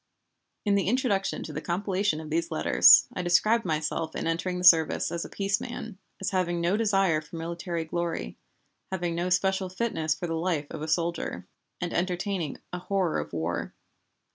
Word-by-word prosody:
In 205 - +3
the 195 -3 +1
introduction 220 -4 0
to - - -7
the - - -4
compilation 185 -1 -1
of 155 -1 -8
these 165 +1 0
letters 160 - +6
I - - -3
described 215 +6 +3
myself 160 0 -2
in - - -3
entering 175 +2 -1
the 180 - -4
service 165 -3 +5
as 170 -1 -2
a - - -8
peace 200 0 -1
man, 225 -5 -7 0.2
as 195 0 -2
having 175 -2 0
no 170 +3 +1
desire 195 -7 +2
for 155 - -12
military 170 0 -4
glory, 165 - -3 0.6
having 175 -2 -2
no 175 +2 -1
special 190 +1 +1
fitness 180 -6 -1
for 170 - -5
the 165 - -3
life 165 -2 -1
of 160 - -6
a 155 - -4
soldier, 170 +1 -1 0.3
and 175 -1 -3
entertaining 180 -2 -2 0.2
a 180 - -3
horror 185 -2 0
of - - -6
war. 85 +1 -3
175 Hz, 180 wpm, -27 LUFS, 165-195 Hz, 0.6 s, letters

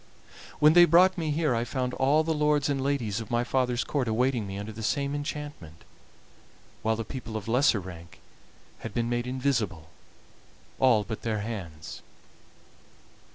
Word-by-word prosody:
When 150 +1 +6
they 175 0 +8
brought 180 +3 +5
me 165 -4 -2
here 150 -2 +1
I 115 0 0
found 125 +1 -2
all 145 +4 +3
the 160 0 0
lords 150 -1 +2
and 140 -2 0
ladies 120 -6 -1
of 110 - -8
my 120 0 +1
father's 125 -1 0
court 135 -5 -1
awaiting 120 -1 +1
me 95 0 -6
under 105 +2 -5
the 110 +1 -8
same 140 +5 -1
enchantment, 145 - -6 1.0
while 110 0 +1
the 115 0 -4
people 115 -3 -6
of 105 - -7
lesser 120 -1 +3
rank 85 -3 -11 0.6
had - - -8
been 120 0 0
made 120 0 -1
invisible, 120 - -1 0.9
all 120 -5 +4
but 110 +1 -6
their 110 -2 -2
hands. 85 -8 -7
120 Hz, 160 wpm, -27 LUFS, 110-145 Hz, 1.0 s, they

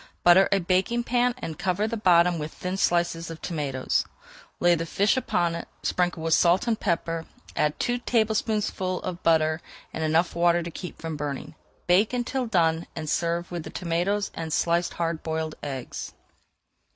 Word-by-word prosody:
Butter 175 +2 +7
a 200 - +5
baking 190 +7 +1
pan 245 0 +1
and 160 -10 -6
cover 190 +3 0
the 230 - -2
bottom 175 -4 +4
with 150 +1 -4
thin 185 +1 -4
slices 170 -2 +1
of 165 -1 -7
tomatoes. 140 -6 -1 0.6
Lay 175 0 +5
the 165 0 -1
fish 200 +7 +2
upon 175 -9 0
it, 170 - -5 0.2
sprinkle 175 -2 0
with 165 0 +2
salt 175 +5 +4
and 230 -2 0
pepper, 165 -1 -1 0.3
add 150 0 0
two 245 0 0
tablespoonfuls 215 -5 0
of 180 -1 -4
butter 160 0 +2 0.3
and 160 - -3
enough 160 +3 +2
water 170 0 +3
to 170 - -6
keep 180 +1 -8
from 160 -1 -4
burning. 145 -2 -4 0.3
Bake 190 +6 +3
until 250 +1 -1
done 165 -5 +2
and 155 - -5
serve 170 +1 -1
with 175 -1 -3
the - - -8
tomatoes 185 +4 -1
and 165 -1 -5
sliced 170 +2 +1
hard 165 -1 -2
boiled 160 -1 -3
eggs. 135 -3 -6
175 Hz, 170 wpm, -26 LUFS, 165-195 Hz, 0.6 s, Butter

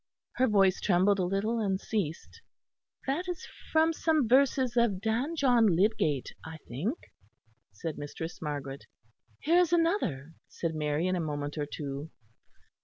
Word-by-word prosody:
Her 260 - +4
voice 195 -4 +3
trembled 195 +1 +3
a 185 - +2
little 200 +5 0
and 195 -3 0
ceased. 190 -8 -4 0.6
"That 305 +7 -1
is 360 +1 -4 0.3
from 320 +1 +4
some 315 -5 +1
verses 260 0 +3
of 235 -6 +2
Dan 230 - -1
John 245 -7 +4
Lydgate, 190 - +1
I 160 0 -8
think," 180 - -2 0.7
said 155 +11 -6
Mistress 160 +3 -6
Margaret. 145 -3 -5 0.5
"Here 340 +3 +4
is 350 -2 +3
another," 330 - +1
said 165 -1 -3
Mary 150 +1 -1
in 185 0 +1
a - - -1
moment 145 -2 -3
or 150 -2 -2
two. 145 +1 -5
195 Hz, 145 wpm, -29 LUFS, 155-260 Hz, 0.7 s, Her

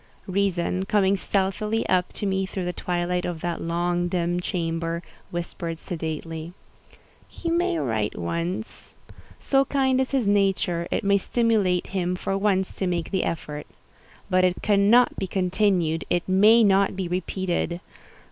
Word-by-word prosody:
Reason, 185 -1 0
coming 200 -1 +3
stealthily 205 +3 -1
up 180 -1 +1
to - - -4
me 190 -1 0
through 190 -1 -4
the 180 - -2
twilight 180 0 -1
of 170 -3 -4
that 175 -1 -3
long, 175 +1 0
dim 175 0 0
chamber, 165 -2 -2 0.3
whispered 170 -1 -4
sedately—"He 165 - -7
may 340 - +1
write 110 -8 -1
once. 170 - -4 0.4
So 270 -1 +3
kind 265 -2 +1
is 260 - -1
his 265 -4 +1
nature, 195 -4 +1
it - - -1
may 200 0 +3
stimulate 210 -5 +1
him 180 -2 -1
for 195 +1 -2
once 195 -1 +1
to 190 - -1
make 170 -2 -2
the 190 -2 +1
effort. 150 -2 -4 0.6
But 185 0 +3
it 180 -1 +1
cannot 210 +4 +4
be 190 - -2
continued—it 180 -3 0
may 210 +5 +6
not 195 -1 +3
be 190 -2 -3
repeated. 180 -1 -2
185 Hz, 140 wpm, -25 LUFS, 170-200 Hz, 0.6 s, may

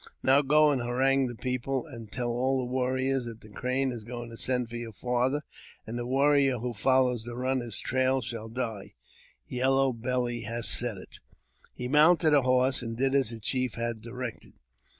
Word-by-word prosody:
Now 135 +2 +5
go 150 +2 +4
and 135 -3 0
harangue 130 +2 +2
the 120 - -6
people, 130 +3 -2
and 115 -8 -10
tell 120 -2 -2
all 130 +3 +1
the 125 -1 -3
warriors 130 0 0
that 115 -1 -8
the 110 - -14
Crane 130 +5 -1
is 120 -3 -7
going 120 +1 -7
to - - -8
send 125 0 0
for 120 - -9
your 120 -1 -5
fath 125 +6 0 0.4
and 110 - -6
the 120 0 -3
warrior 135 0 +3
who 120 +1 -4
follows 125 +1 +2
the 120 +1 -7
runner's 125 -3 -2
trail 130 +1 +1
shall 115 -2 -5 1.0
Yellow 135 +1 +2
Belly 120 0 -1
has 115 0 -2
said 120 -4 +2
it." - - -12 0.6
He 125 - -4
mounted 155 +3 +5
a 145 - +6
horse, 130 +1 +2
and 115 -1 -5
did 135 +1 +1
as 135 -5 +3
the 115 -1 -4
chief 125 +1 -1
had 115 -1 -3
directed. 120 0 -7
125 Hz, 185 wpm, -28 LUFS, 120-135 Hz, 1.0 s, a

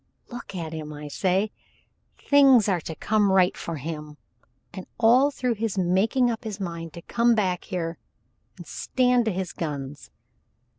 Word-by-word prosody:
Look 240 -5 -8
at 165 -3 -5
him 155 -1 -6
I 150 0 -8
say. 190 +7 0 0.7
Things 270 -6 +5
are 180 -4 +1
to 160 - -7
come 205 +3 +1
right 185 -1 +4
for 165 - -5
him, 150 0 -7 0.6
and 190 - -8
all 245 +5 +5
through 250 -3 -1
his 220 -2 -3
making 200 +8 +2
up 225 +1 -5
his 215 -2 -6
mind 170 -3 -5
to 170 -1 -10
come 235 0 +2
back 185 -5 -1
here 170 -2 -4 0.6
and - - -10
stand 250 -2 +1
to 220 - +1
his 185 -1 -4
guns. 145 -3 -6
190 Hz, 160 wpm, -25 LUFS, 165-230 Hz, 0.7 s, Things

